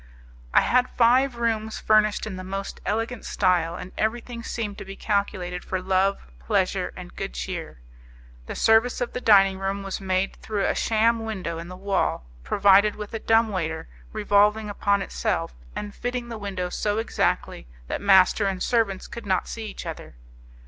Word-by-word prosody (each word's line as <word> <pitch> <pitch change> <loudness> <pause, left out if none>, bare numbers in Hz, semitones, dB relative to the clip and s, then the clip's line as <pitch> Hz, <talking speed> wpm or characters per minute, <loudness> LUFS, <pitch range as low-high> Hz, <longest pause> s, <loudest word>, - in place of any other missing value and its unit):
I - - +6
had 250 0 +2
five 250 +2 +3
rooms 220 -2 -1
furnished 215 -1 +3
in 215 -3 -5
the 185 - -7
most 195 +1 -5
elegant 225 +2 -2
style, 180 -4 +1
and 180 +1 -8
everything 235 +2 -2
seemed 220 -3 -4
to - - -6
be 195 0 -9
calculated 190 -4 -2
for 185 - -2
love, 190 +1 +1
pleasure, 65 - 0
and - - -10
good - - -5
cheer. - - -5 0.7
The - - -5
service 225 +2 +3
of 245 - -3
the 250 - -4
dining 195 -4 +5
room 195 +1 -2
was 195 0 -4
made 190 0 -1
through 210 -2 -2
a - - +2
sham 225 +1 +2
window 185 -7 -4
in 170 - -7
the 185 +1 -9
wall, 195 - -1 0.2
provided 200 - +4
with 210 0 -8
a 225 - -2
dumb 225 +1 +3
waiter 160 -5 -3 0.2
revolving 210 0 +2
upon 200 0 +1
itself, - - -2 0.2
and 205 -1 -5
fitting 245 +1 -4
the 230 -2 -6
window 190 -3 -3
so 205 +3 -1
exactly 225 - -1 0.2
that - - -4
master 195 +1 +5
and 190 -1 -2
servants 220 -6 +1
could 235 -3 -9
not 185 -2 +1
see 225 -1 -5
each - - -8
other. - - -7
205 Hz, 175 wpm, -25 LUFS, 190-225 Hz, 0.7 s, I